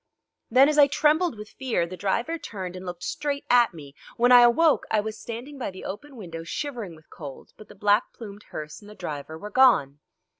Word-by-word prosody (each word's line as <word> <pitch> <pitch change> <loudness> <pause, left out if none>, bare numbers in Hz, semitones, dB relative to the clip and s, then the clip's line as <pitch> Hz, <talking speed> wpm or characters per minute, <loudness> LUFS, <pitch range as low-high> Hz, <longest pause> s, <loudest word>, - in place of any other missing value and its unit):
Then, 260 +4 +6
as 300 0 +2
I 285 - +8
trembled 305 0 +2
with 210 0 -10
fear, 250 -10 -1
the 180 +2 -8
driver 235 - -1
turned 190 -10 -7
and 185 0 -8
looked 175 -1 -7
straight 285 -1 -3
at 240 -1 +5
me. 145 -5 -12 0.2
When 245 +1 +4
I 245 -1 +10
awoke 270 +7 +4
I 215 - +2
was 215 +1 -4
standing 250 +5 -8
by 250 - -3
the 185 -1 -10
open 275 +8 -7
window 165 -7 -8
shivering 225 - -5
with 155 0 -21
cold, 140 -4 -10
but 215 - -14
the - - -14
black 210 +2 +2
plumed 205 -3 -11
hearse 150 +3 -7
and 205 - -14
the 210 - -12
driver 150 -1 -6
were 210 +5 -8
gone. 200 - +4
215 Hz, 215 wpm, -25 LUFS, 180-265 Hz, 0.2 s, I